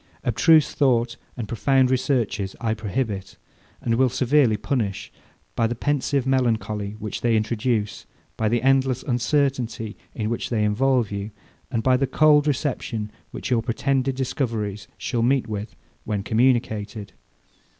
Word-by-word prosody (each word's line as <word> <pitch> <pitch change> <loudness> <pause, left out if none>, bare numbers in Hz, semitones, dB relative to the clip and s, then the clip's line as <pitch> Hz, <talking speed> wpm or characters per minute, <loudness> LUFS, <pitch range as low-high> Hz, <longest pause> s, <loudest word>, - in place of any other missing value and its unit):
Abstruse 145 +6 +4
thought 120 -4 +2 0.2
and 115 -3 -4
profound 130 +3 +2
researches 125 -7 0
I 115 -1 0
prohibit, 105 -2 -3 0.4
and 115 - 0
will 130 +2 +3
severely 130 -2 +3
punish, 105 -4 -2 0.4
by 115 - +2
the 120 - -3
pensive 140 0 0
melancholy 110 -6 0
which 105 -1 -5
they 115 -2 +3
introduce, 110 0 -1 0.3
by 110 -1 0
the 120 +1 0
endless 135 -1 +2
uncertainty 125 -4 0 0.2
in 110 -3 -2
which 120 - -3
they 110 -3 +1
involve 120 +1 +2
you, 100 +1 -4 0.4
and 115 -4 -1
by 130 -1 +4
the 135 +1 0
cold 150 +2 +4
reception 125 -7 -2 0.2
which - - -6
your 120 -2 +3
pretended 130 +2 0
discoveries 115 -6 -2
shall 120 -3 -2
meet 130 +2 +2
with, 105 -1 -5 0.3
when 105 -3 -2
communicated. 110 -3 0
120 Hz, 140 wpm, -23 LUFS, 110-130 Hz, 0.4 s, Abstruse